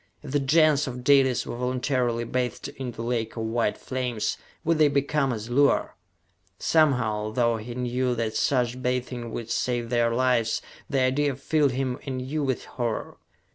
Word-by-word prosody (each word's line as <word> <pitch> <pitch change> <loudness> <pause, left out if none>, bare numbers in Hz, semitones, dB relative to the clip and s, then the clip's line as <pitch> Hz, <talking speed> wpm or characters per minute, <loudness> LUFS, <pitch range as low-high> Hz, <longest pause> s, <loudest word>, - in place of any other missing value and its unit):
If 145 - -7
the 145 - +2
Gens 150 +1 +4
of 125 -1 -6
Dalis 135 -2 +4
were - - -5
voluntarily 125 -1 0
bathed 125 +3 -2
in 135 -3 -6
the 115 - -7
lake 115 -2 -2
of 115 - -2
white 110 -1 0
flames, 125 -4 -2 0.3
would 165 0 +1
they 155 - +7
become 140 0 +1
as 110 -2 -4
Luar? 140 +3 +3 0.7
Somehow, 125 -10 +2
though 115 +1 +1
he 120 +2 -7
knew 125 0 0
that 115 -2 -2
such 125 -3 +1
bathing 125 -1 -2
would 115 0 -5
save 120 -1 -1
their 120 -1 +2
lives, 120 -2 +2 0.3
the 135 -2 +1
idea 135 +2 +2
filled 140 0 +1
him 130 -1 -2
anew 135 +3 -3
with 135 -3 -1
horror. 120 -3 -4
125 Hz, 165 wpm, -26 LUFS, 120-135 Hz, 0.7 s, they